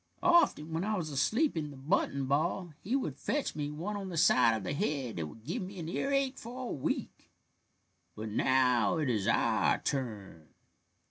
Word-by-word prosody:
Often 255 - +4
when 165 +2 -1
I 215 +1 0
was 160 -4 -3
asleep 220 - +1
in 155 -2 -2
the 140 - -11
button 140 -2 0
ball 160 +5 0
he 230 +8 -1
would 155 - -2
fetch 290 -1 -1
me 145 -1 -2
one 170 +8 -4
on 195 -2 -5
the 170 - -5
side 120 -6 +5
of 105 - -7
the 140 - -2
head 140 -6 -2
that 80 -2 -2
would 110 +8 -13
give 170 - -3
me 190 +1 -7
an 165 -3 -5
earache 275 +7 0
for 245 +3 -7
a - - -2
week. 135 - -3 0.9
But 110 +1 -5
now 125 0 +3
it 150 -4 0
is 105 -4 -1
our - - +3
turn." 105 - -4
150 Hz, 190 wpm, -31 LUFS, 130-195 Hz, 0.9 s, side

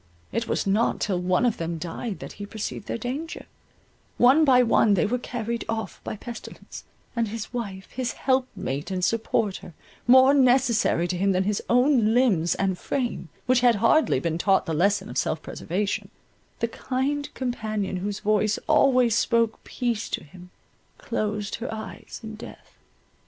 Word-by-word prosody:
It 230 +2 -2
was - - -1
not 205 +4 +1
till 190 -4 0
one 180 +6 +1
of 235 - +1
them 165 0 -3
died 180 +6 -5
that - - -7
he 205 - -5
perceived 215 -1 -5
their - - -2
danger; 270 +8 -5 0.7
one 265 +6 +6
by 255 -4 +6
one 225 -3 +4
they 190 - +2
were 245 +4 0
carried 235 -1 -4
off 220 -2 -4
by - - -4
pestilence; 235 +1 -9 0.3
and 230 -1 +1
his 225 +2 -6
wife, 200 -6 -5
his 255 -2 -3
helpmate 255 - -1
and 185 -1 0
supporter, 215 -6 -1 0.3
more 260 +2 +7
necessary 250 -9 +3
to 180 - -2
him 195 +2 +2
than 185 +1 +2
his 205 +1 -1
own 245 -3 +4
limbs 195 -10 +3
and 190 -2 -1
frame, 245 -10 -3 0.2
which 255 0 +4
had 240 -1 +4
hardly 230 +9 +3
been 165 -1 -2
taught 195 +1 +3
the 165 - -2
lesson 200 +6 +2
of 125 +2 -2
self 155 - -1
preservation, 200 +4 -3 0.5
the 230 - +2
kind 275 +5 -2
companion 215 -6 -2
whose 200 +2 -4
voice 215 0 +2
always 255 -6 +4
spoke 230 -1 +1
peace 240 -4 -2
to - - -3
him, 180 +3 -14 0.5
closed 210 -1 -3
her 235 - -5
eyes 220 0 -8
in 220 0 -7
death. 215 - -12
220 Hz, 165 wpm, -25 LUFS, 195-245 Hz, 0.7 s, more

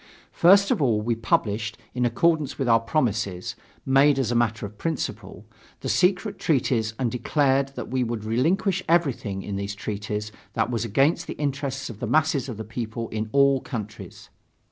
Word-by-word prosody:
First 195 +3 +5
of - - +1
all, 115 -6 +3
we 115 +3 0
published, 110 -1 -1 0.2
in 125 0 0
accordance 155 +3 +1
with 135 - -1
our 115 -1 +5
promises, 110 - -1 0.3
made 135 +1 +5
as 130 -4 0
a - - 0
matter 110 -3 +1
of 100 +1 -10
principle, 110 - -4 0.4
the - - -3
secret 190 +3 +1
treaties 120 -7 +1
and 125 -3 -1
declared 135 +2 +1
that - - -6
we 130 -1 +1
would 115 -2 -3
relinquish 165 - +1
everything 130 - +1
in 100 -1 -4
these 100 +1 -4
treaties 105 +1 -4 0.2
that 120 - 0
was 115 -2 -1
against 135 +8 +2
the - - -5
interests 140 -2 -3
of 110 -3 -9
the - - -3
masses 155 -4 +2
of 115 - -6
the 110 - -5
people 115 0 -5
in 110 0 -3
all 140 -1 +4
countries. 110 -4 -8
120 Hz, 175 wpm, -25 LUFS, 110-140 Hz, 0.4 s, First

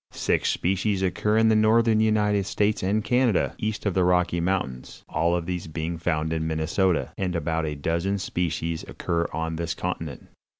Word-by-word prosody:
Six - - 0
species 95 +2 0
occur 105 +3 +1
in 110 0 +5
the 110 - +4
northern 110 +1 +4
United 105 -2 +2
States 105 +2 +1
and 105 +3 0
Canada, 125 -4 +2
east 110 0 -3
of 100 - +1
the 95 - +2
Rocky 90 -1 +2
Mountains, 85 -9 -3
all 85 +2 +1
of 85 -1 -2
these 90 -1 -4
being 80 +1 -4
found 80 -2 -1
in 80 0 -1
Minnesota, 80 +3 0
and 90 -2 -1
about 80 0 -1
a 75 - -3
dozen 85 +7 -1
species 85 -3 -2
occur 85 0 -2
on 80 +1 -3
this 85 0 -2
continent. 80 -5 -4
90 Hz, 175 wpm, -25 LUFS, 80-105 Hz, -, in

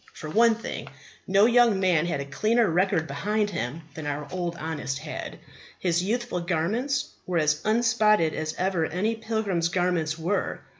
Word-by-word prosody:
For 155 - -7
one 230 +3 +5
thing, 230 - -6 0.4
no 195 +2 +5
young 235 -4 +4
man 175 -4 +2
had 145 -5 -1
a - - -5
cleaner 215 - +2
record 175 -2 +2
behind 210 +4 -1
him 125 - -4
than 155 -2 -6
our 145 0 -3
Honest 160 -6 -3
had; - - -6 0.4
his 175 -1 0
youthful 235 -1 -1
garments 200 - -1 0.2
were 180 -2 0
as 150 -1 +2
unspotted 215 -6 +3
as 155 0 -3
ever 180 -3 0
any 195 +7 -1
pilgrim's 220 -6 -1
garments 175 -3 0
were. 175 +5 -2
180 Hz, 155 wpm, -26 LUFS, 160-220 Hz, 0.4 s, one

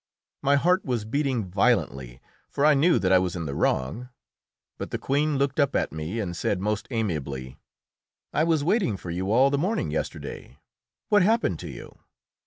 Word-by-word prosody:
My 140 0 +3
heart 180 +7 +3
was 120 -5 -2
beating 130 -2 -1
violently, 65 -9 0 0.3
for 140 - 0
I 155 - +7
knew 155 +5 +4
that 95 - +1
I 95 - +7
was 90 -1 -2
in 85 -2 -4
the 70 - -4
wrong. 75 - -1 0.7
But - - -5
the - - -2
Queen 145 +1 0
looked 140 +1 0
up 140 -1 +2
at - - 0
me 80 +8 -4
and 90 -5 -3
said 90 +2 -1
most 105 +2 -2
amiably, 70 - -3 0.7
"I 155 - +2
was 160 -3 +2
waiting 175 - +1
for 90 - -7
you 95 +3 -2
all 130 +4 +5
the 140 - +1
morning 200 +8 -1
yesterday; - - -5 0.5
what 205 -2 +5
happened 220 +5 +2
to - - -7
you?" - - -11
120 Hz, 185 wpm, -26 LUFS, 90-145 Hz, 0.7 s, I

